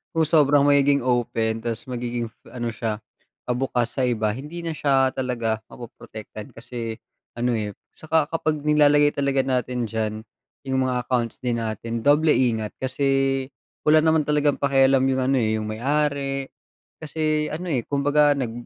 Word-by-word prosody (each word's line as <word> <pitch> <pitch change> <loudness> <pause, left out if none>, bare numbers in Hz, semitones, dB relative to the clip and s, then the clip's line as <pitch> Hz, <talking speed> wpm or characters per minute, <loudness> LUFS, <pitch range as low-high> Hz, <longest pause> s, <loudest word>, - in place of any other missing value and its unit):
kung 165 - +3
sobrang 145 -2 +4
magiging 140 -1 +4
open 115 -2 0
tas 115 -1 -3
magiging 120 -1 -3 0.2
ano 120 -2 -4
siya, 110 -2 -3 0.5
pa-bukas 125 -1 -1
sa 130 - +2
iba 110 -3 0
hindi 150 +8 -7
na 165 - -1
siya 135 -3 +2
talaga 115 -4 -1
mapoprotektan 110 0 -10
kasi, 115 -1 -6 0.4
ano, 120 +1 0
eh, 105 -2 -3 0.2
tsaka 155 -1 0
kapag 155 -2 -1
nilalagay 145 -1 +4
talaga 140 -1 +1
natin 125 -2 -1
diyan, 110 -1 -1 0.5
'yung 130 0 0
mga 125 -1 -1
accounts 120 -3 -1
din 120 -2 0
natin, 115 +1 -4
doble 150 +2 +4
ingat 110 -4 0
kasi, 135 0 0 0.4
wala 155 +1 +7
naman 160 -1 +3
talagang 150 -1 +2
pakialam 135 -1 +4
'yung 130 0 +1
ano, 135 +1 +2
eh, 110 -2 +1
'yung 105 - -4
may 110 +1 -5
ari. 140 -1 0 0.6
Kasi 155 0 -1
ano, 175 +4 -5
eh, 125 -5 0
kumbaga 145 +1 +3
nag 125 -5 -2
130 Hz, 155 wpm, -23 LUFS, 120-145 Hz, 0.6 s, wala